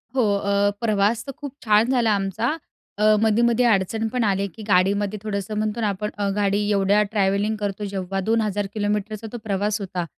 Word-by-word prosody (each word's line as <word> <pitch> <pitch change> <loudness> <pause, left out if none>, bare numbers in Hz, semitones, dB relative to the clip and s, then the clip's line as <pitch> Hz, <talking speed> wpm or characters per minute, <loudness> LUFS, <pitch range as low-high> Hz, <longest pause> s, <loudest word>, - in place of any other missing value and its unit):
हो. 255 - +3 0.2
अ, 200 0 +1
प्रवास 215 0 +1
तर 275 - -5
खूप 285 -2 -7
छान 215 +3 +4
झाला 235 -4 +2
आमचा. 200 - -1 0.4
अ, 215 +1 +4
मधे-मधे 235 +2 +3
अडचण 220 0 +1
पण 250 -2 +1
आली, 200 -1 +1
की 220 - -9
गाडीमध्ये 200 +2 +2
थोडंसं 210 0 -3
म्हणतो 215 +2 -1
ना 215 - +1
आपण, 210 +2 -3 0.3
गाडी 205 0 +1
एवढ्या 200 +1 +3
ट्रॅव्हलिंग 205 +1 +1
करतो 205 0 -3
जेव्हा, 195 -1 -3
2,000 210 -1 0
किलोमीटरचा 210 +1 -2
तो - - -3
प्रवास 205 +1 -1
होता. 180 -3 -3
210 Hz, 170 wpm, -23 LUFS, 200-220 Hz, 0.4 s, छान